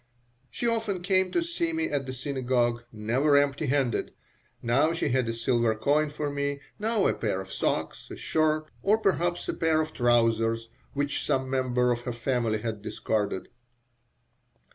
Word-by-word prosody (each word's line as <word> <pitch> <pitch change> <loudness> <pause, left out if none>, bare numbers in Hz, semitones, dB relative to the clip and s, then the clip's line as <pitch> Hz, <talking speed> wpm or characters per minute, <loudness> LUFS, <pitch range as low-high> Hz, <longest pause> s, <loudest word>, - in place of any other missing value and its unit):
She - - -4
often 220 -6 -1
came 185 0 +2
to 345 - +1
see 335 0 -2
me 325 +1 0
at 140 -2 -2
the 130 - -4
synagogue, 125 -3 0
never 125 +7 +2
empty 145 +1 +1
handed. 135 -3 0 0.5
Now 140 +7 +3
she 165 - -1
had 125 -2 +1
a - - -1
silver 115 -1 +1
coin 145 +7 +2
for 145 0 -3
me, 140 0 -2 0.2
now 220 -1 +1
a - - +3
pair 105 -4 -1
of 95 0 -7
socks, - - -2
a - - -6
shirt, 155 0 +1 0.2
or 210 +2 +4
perhaps 175 -4 0
a - - -1
pair 160 -1 +2
of 155 0 -2
trousers 115 -1 +2 0.3
which 145 0 -1
some 130 -2 0
member 125 -2 +2
of 120 0 -1
her 120 0 -4
family 115 -3 0
had 110 -3 -3
discarded. 105 -2 -2
135 Hz, 165 wpm, -27 LUFS, 120-155 Hz, 0.5 s, or